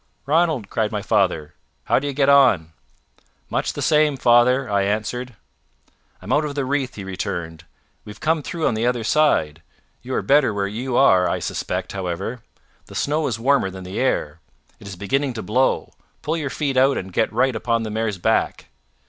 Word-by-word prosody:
"Ranald!" 155 -6 +1
cried 110 -2 0
my 105 -2 -3
father; 90 -9 0 0.3
"how - - +2
do 145 - -4
you 140 - -3
get 135 0 +1
on?" 125 - +4 0.8
"Much - - -1
the - - -4
same, 150 -2 +3
father," 125 +2 +4
I 100 -2 +1
answered. 110 +5 -2 0.9
"I'm - - -2
out 145 +2 +3
of 145 -2 -4
the 140 -2 -1
wreath," 135 -1 -2
he 100 - -7
returned. 85 -3 -5 0.4
"We've 105 - -11
come 160 0 +1
through 165 +2 -4
on - - +2
the 110 +2 0
other 125 -2 0
side. 110 - +2 0.4
You 130 +1 -5
are - - -1
better 140 -6 +3
where 100 -1 0
you 120 +5 -3
are 95 -10 +5
I - - 0
suspect, - - -4
however. 95 +5 -4 0.5
The - - -12
snow 150 +1 0
is 115 -5 -2
warmer 130 -3 +2
than 95 0 -9
the 95 +2 -5
air. 80 - -1 0.4
It 100 - -12
is 100 - -7
beginning 130 +8 -1
to 110 - -6
blow. 125 +8 0 0.3
Pull 155 - -1
your 145 -4 -3
feet 140 -1 -2
out 135 +2 +4
and 95 -1 -6
get 110 - +1
right 125 +3 +1
upon 115 0 0
the 110 - -5
mare's 110 -2 -2
back." 85 - 0
120 Hz, 190 wpm, -21 LUFS, 100-140 Hz, 0.9 s, are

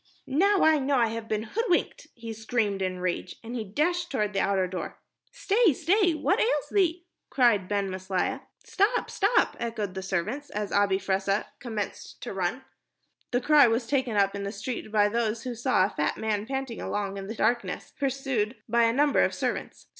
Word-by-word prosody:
"Now 385 +8 +3
I 315 -1 +5
know 275 +1 +1
I 235 -3 +3
have 225 0 -5
been 215 -1 -1
hoodwinked," 405 - -1
he 230 -1 -7
screamed 220 -3 -1
in 185 -1 -2
rage, 180 0 -2
and 230 +1 -7
he 230 - -2
dashed 345 - -1
toward 210 -6 -1
the 195 - 0
outer 195 -1 +2
door. 185 0 -5 0.3
"Stay, 455 - +3
stay 350 - +2
what 310 - +1
ails - - +1
thee?" 350 -3 +1 0.2
cried 230 -8 +3
Ben 200 -1 0
Maslia. 190 +8 -2 0.2
"Stop, 415 +6 +1
stop," 425 +4 +2
echoed 220 -5 -3
the 190 - -4
servants, 195 +10 -3
as 210 -1 -4
Abi 200 -1 +3
Fressah 195 +1 0
commenced 220 -5 -5
to - - -5
run. 195 +7 -2 0.7
The 245 - 0
cry 295 -2 +6
was 230 +1 0
taken 260 -3 0
up 195 -1 +3
in 200 - -4
the 200 0 -3
street 230 -1 -5
by 210 -1 +4
those 225 +1 -1
who 250 - -4
saw 240 -5 +2
a - - -2
fat 150 - -1
man 215 -1 -2
panting 265 -3 -4
along 200 -1 -3
in 195 0 -6
the 220 - -5
darkness, 235 +2 -1
pursued 265 -5 -1
by 235 +1 +3
a 230 - +2
number 290 +3 +3
of - - +1
servants. - - -3
230 Hz, 190 wpm, -27 LUFS, 200-280 Hz, 0.7 s, cry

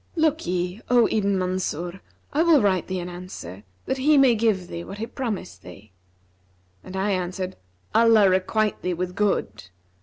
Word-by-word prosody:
'Look'ye, 195 - 0
O 245 -2 +5
Ibn 200 -2 +1
Mansur, 180 -1 -3 0.3
I 300 - +2
will 330 -3 +5
write 190 -5 +1
thee 185 -1 -3
an 175 - -5
answer, 175 - -9 0.2
that 265 - -2
he 295 +3 +4
may 270 -3 +6
give 210 -5 +1
thee 170 -1 -6
what 195 - -8
he 220 - -3
promised 225 - -5
thee.' 95 +3 -13 0.9
And 185 - -9
I 200 +2 0
answered, 185 0 -3 0.4
'Allah 225 -3 +6
requite 190 +3 +1
thee 180 -1 -1
with 180 +1 -3
good!' 110 - -1
190 Hz, 160 wpm, -24 LUFS, 180-225 Hz, 0.9 s, may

